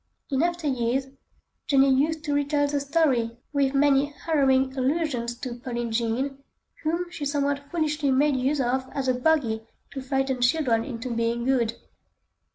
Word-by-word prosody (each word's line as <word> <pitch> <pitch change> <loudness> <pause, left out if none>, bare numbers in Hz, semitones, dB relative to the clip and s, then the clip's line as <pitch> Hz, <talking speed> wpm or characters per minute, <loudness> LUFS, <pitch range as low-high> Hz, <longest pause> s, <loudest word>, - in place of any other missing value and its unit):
In 270 0 +1
after 345 -1 -1
years, 260 -1 0 0.6
Jenny 275 -1 +5
used 310 +4 +1
to 295 -1 -1
retail 290 0 +1
the 285 0 0
story 275 -6 +1 0.2
with 280 -1 +1
many 280 0 +4
harrowing 270 -3 +1
allusions 260 -4 -1
to 255 -3 -4
"Pearlin' 240 -1 -4
Jean," 240 +5 -1 0.4
whom 340 +3 -2
she 300 - -6
somewhat 285 0 -1
foolishly 305 -4 0
made 280 +2 +3
use 270 +3 0
of 260 +1 0
as 275 -2 -2
a 255 - +3
bogey 250 -4 +1 0.3
to 270 - -5
frighten 265 -1 -1
children 245 -3 +2
into 245 -2 -5
being 230 +1 -1
good. 245 -4 +1
270 Hz, 155 wpm, -25 LUFS, 250-290 Hz, 0.6 s, Jenny